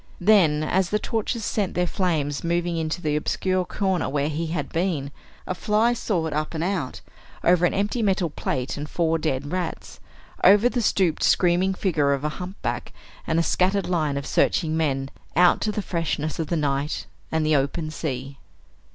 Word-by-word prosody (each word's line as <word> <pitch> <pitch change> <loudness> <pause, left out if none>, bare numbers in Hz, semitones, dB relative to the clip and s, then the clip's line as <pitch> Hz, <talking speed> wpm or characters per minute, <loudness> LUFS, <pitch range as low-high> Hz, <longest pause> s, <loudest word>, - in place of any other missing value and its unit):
Then, 175 -6 +4
as 180 +3 +1
the 210 - +2
torches 225 +1 -2
sent 200 -4 -1
their 180 - +2
flames 160 -6 -1
moving 170 0 0
into 160 +1 -2
the 150 -1 +1
obscure 185 +4 0
corner 190 -6 -1
where 145 +1 0
he 160 +2 -2
had 165 +2 -3
been, 165 -5 -1 0.3
a - - -2
fly 215 +5 +2
soared 175 -9 -1
up 155 +2 -2
and 160 - -1
out, 175 -8 -2 0.4
over 175 0 +4
an - - -3
empty 205 +4 0
metal 190 -6 +1
plate 130 -2 -3
and 145 +1 -5
four 165 -1 +1
dead 145 -2 -2
rats, 180 -2 -4 0.4
over 205 +5 +7
the 245 -1 -1
stooped 185 -7 +1
screaming 185 +2 +3
figure 150 -8 +1
of 140 0 -3
a 150 - 0
humpback, 185 +3 -4 0.3
and 160 - +1
a 165 - +3
scattered 190 +3 +1
line 155 -6 0
of 140 - -4
searching 160 -2 +1
men, 135 -4 -1 0.2
out 180 +1 +5
to 215 - 0
the 210 -1 -3
freshness 165 -3 -2
of 160 - -1
the 170 - 0
night 145 0 -1 0.3
and 160 -1 +1
the 155 0 +3
open 145 +3 -1
sea. 135 -3 -5
165 Hz, 180 wpm, -24 LUFS, 150-185 Hz, 0.4 s, over